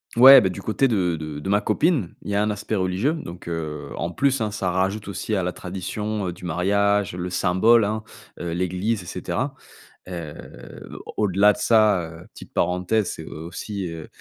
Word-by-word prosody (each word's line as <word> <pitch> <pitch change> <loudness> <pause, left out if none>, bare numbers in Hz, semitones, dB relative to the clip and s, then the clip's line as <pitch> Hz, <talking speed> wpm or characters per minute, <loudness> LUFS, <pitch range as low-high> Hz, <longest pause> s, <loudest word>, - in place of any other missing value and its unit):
Ouais, 135 +3 +11
bah, 95 - +2
du 95 +2 -6
côté 110 +7 +1
de 95 -8 +1
de 75 -2 -6
de 75 - -5
ma 100 +1 +4
copine, 115 - +1
il - - -6
y - - 0
a 100 - +3
un 105 - +1
aspect 105 +1 -3
religieux. 95 +8 +1
Donc, 90 - -8
heu, 75 -3 -4
en 85 - -2
plus 135 +6 +1
hein, 105 -1 -1
ça 95 -3 -1
rajoute 95 +4 -1
aussi 105 +2 -2
à 95 - 0
la 90 - -1
tradition, 95 +3 -4
heu, - - -4
du 90 - -11
mariage, 100 +2 +1
le 90 0 -4
symbole 95 +6 +4
hein, 110 +1 -2 0.4
heu, 85 -1 -4
l'église 95 +4 -1
et - - -13
cetera. - - -3 0.5
Heu 85 -5 -6 0.7
au - - -9
au-delà 100 +2 +5
de - - -10
ça, 110 -5 +4 0.2
heu, - - -14
petite - - -13
parenthèse, 90 +4 +1
c'est, 80 - -8
heu, - - -9 0.2
aussi, 95 +2 -5
heu, 80 -2 -8
95 Hz, 205 wpm, -23 LUFS, 90-105 Hz, 0.7 s, Ouais